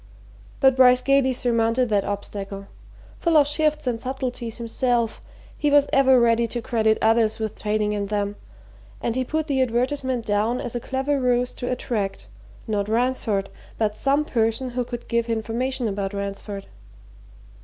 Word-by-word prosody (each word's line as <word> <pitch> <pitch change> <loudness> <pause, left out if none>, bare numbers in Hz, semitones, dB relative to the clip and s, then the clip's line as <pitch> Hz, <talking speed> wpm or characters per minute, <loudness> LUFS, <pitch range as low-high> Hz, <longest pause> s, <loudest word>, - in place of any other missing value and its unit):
But 265 -2 +5
Bryce 250 -1 +6
gaily 275 -1 +3
surmounted 235 0 +1
that 205 -2 +2
obstacle 200 -1 -5 0.5
full 335 -2 +3
of 290 - +6
shifts 305 0 0
and 235 -3 -1
subtleties 250 -3 -4
himself, 235 0 -1 0.3
he 295 - 0
was 285 0 +5
ever 265 -2 +5
ready 235 0 +3
to 240 - -4
credit 220 -2 +1
others 225 -1 +3
with 220 -1 -5
trading 210 0 0
in 200 -1 -2
them, 205 0 -2 0.6
and 235 - -2
he 260 - +1
put 310 +4 -2
the 275 -4 0
advertisement 255 0 0
down 215 +4 +1
as 240 - -5
a 240 - -2
clever 270 +3 -1
ruse 250 -1 +1
to 245 - -5
attract, 215 -6 -3 0.4
not 205 -2 -1
Ransford, 225 -4 0 0.3
but 210 -2 0
some 280 +5 +1
person 230 0 0
who 250 +1 -1
could 240 0 -7
give 235 0 0
information 235 +3 -1
about 200 -1 -3
Ransford. 200 0 -5
235 Hz, 155 wpm, -23 LUFS, 215-260 Hz, 0.6 s, Bryce